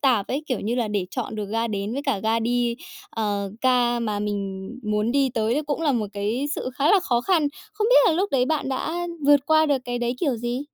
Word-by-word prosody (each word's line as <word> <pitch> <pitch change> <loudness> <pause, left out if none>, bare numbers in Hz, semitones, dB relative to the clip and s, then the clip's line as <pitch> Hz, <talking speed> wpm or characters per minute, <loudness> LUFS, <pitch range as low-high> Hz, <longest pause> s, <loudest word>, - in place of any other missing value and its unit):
tạp 245 -8 +2
ấy, 280 +4 -2
kiểu, 255 -7 -1
như 225 +4 -1
là 240 -3 0
để 205 -3 -1
chọn 250 -4 -4
được 210 -1 -3
ga 225 +1 0
đến 205 0 -3
với 280 - -3
cả 275 -8 0
ga 220 +2 +1
đi, 240 0 0 0.3
ờ, 205 -3 -2
ga 245 -2 +3
mà 215 -3 -2
mình 195 -2 -3
muốn 215 +2 0
đi 275 -1 +3
tới 225 +2 +1
đấy 300 - 0
cũng 295 +2 -2
là 295 -4 +2
một 220 -4 0
cái 215 +7 -1
sự 255 - -4
khá 290 +4 +4
là 405 - +5
khó 240 -9 +1
khăn. 315 -1 +2 0.2
Không 425 +1 0
biết - - +7
là 345 - +4
lúc 380 +5 0
đấy 255 -2 +3
bạn 300 -2 -1
đã 325 +6 -2 0.2
vượt 290 -1 +7
qua 315 0 +4
được 285 -2 +2
cái 245 -1 -3
đấy 240 0 -1
kiểu 275 -8 +1
gì? 240 +2 -3
240 Hz, 250 wpm, -24 LUFS, 215-285 Hz, 0.3 s, biết